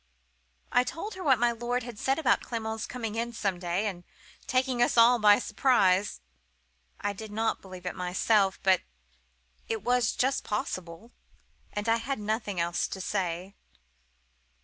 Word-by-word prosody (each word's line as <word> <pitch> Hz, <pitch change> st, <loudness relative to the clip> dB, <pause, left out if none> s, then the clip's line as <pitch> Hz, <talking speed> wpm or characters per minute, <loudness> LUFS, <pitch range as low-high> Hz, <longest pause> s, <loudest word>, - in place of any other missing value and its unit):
"I 245 Hz, -, +4 dB
told 330 Hz, -, -5 dB
her 375 Hz, -, -7 dB
what 270 Hz, -5 st, +5 dB
my 240 Hz, +1 st, +3 dB
lord 240 Hz, +1 st, -2 dB
had 235 Hz, -3 st, -8 dB
said 270 Hz, +1 st, +1 dB
about 315 Hz, -5 st, +2 dB
Clement's 220 Hz, -2 st, -4 dB
coming 230 Hz, -4 st, -4 dB
in 235 Hz, +1 st, -2 dB
some 195 Hz, -5 st, -2 dB
day, 175 Hz, +3 st, -1 dB
and 185 Hz, -4 st, -4 dB, 0.4 s
taking 255 Hz, -1 st, +1 dB
us 240 Hz, -, +2 dB
all 235 Hz, +1 st, +7 dB
by 210 Hz, -1 st, +7 dB
surprise. 205 Hz, -7 st, +2 dB, 0.8 s
I 205 Hz, -, -2 dB
did 215 Hz, +1 st, -9 dB
not 225 Hz, +2 st, -1 dB
believe 185 Hz, -2 st, -11 dB
it 180 Hz, -, -2 dB
myself, 190 Hz, +2 st, +1 dB
but 190 Hz, -2 st, +4 dB, 0.9 s
it 225 Hz, -3 st, -3 dB
was 245 Hz, -1 st, +2 dB
just 265 Hz, +2 st, 0 dB
possible,—and 205 Hz, +2 st, -7 dB
I 225 Hz, 0 st, +4 dB
had 265 Hz, +4 st, -3 dB
nothing 210 Hz, -2 st, -2 dB
else 170 Hz, 0 st, 0 dB
to 190 Hz, -, -6 dB
say. 185 Hz, -1 st, -2 dB
220 Hz, 150 wpm, -28 LUFS, 190-245 Hz, 0.9 s, all